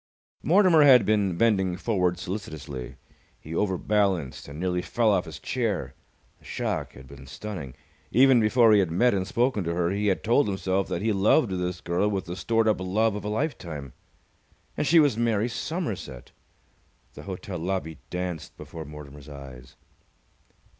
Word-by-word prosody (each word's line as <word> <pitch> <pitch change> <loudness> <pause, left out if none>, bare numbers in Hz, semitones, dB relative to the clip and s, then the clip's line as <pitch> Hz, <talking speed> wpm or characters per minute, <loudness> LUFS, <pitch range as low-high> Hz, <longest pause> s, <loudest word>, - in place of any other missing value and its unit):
Mortimer 175 0 +5
had 130 -7 +7
been 100 -4 +1
bending 95 -5 +2
forward 90 -4 0
solicitously. 80 - -6 0.4
He 80 - -9
overbalanced 95 -5 0
and 70 +2 -9
nearly 90 0 0
fell 110 +4 +1
off 95 -3 +1
his 80 - -8
chair. 115 -6 -2 0.5
The - - -23
shock - - -3
had 65 - -13
been 70 +1 -13
stunning. 85 -11 -7 0.4
Even 130 +2 +6
before 115 +1 +5
he 105 - +6
had 95 -4 +1
met 120 +9 +3
and 95 -2 -1
spoken 120 -4 +1
to 85 0 -2
her, 85 0 0
he 105 +1 -1
had 95 - 0
told 120 +3 +3
himself 95 -1 -1
that 85 - -3
he 110 -1 +2
loved 105 +5 +3
this 90 -1 -3
girl 90 +4 0
with 100 -3 -2
the 85 - -6
stored 115 +4 +1
up 105 -3 +2
love 105 +4 +1
of 105 -1 -5
a 105 - -3
lifetime. 85 - -4 0.8
And - - -1
she 165 - +6
was 145 -7 +3
Mary 115 -2 +1
Somerset! 115 - -5 0.8
The - - -10
hotel 95 -1 -6
lobby 85 -3 -3
danced 90 -3 -5
before 80 -1 -8
Mortimer's 75 -1 -11
eyes. 65 -3 -11
95 Hz, 165 wpm, -26 LUFS, 85-110 Hz, 0.8 s, had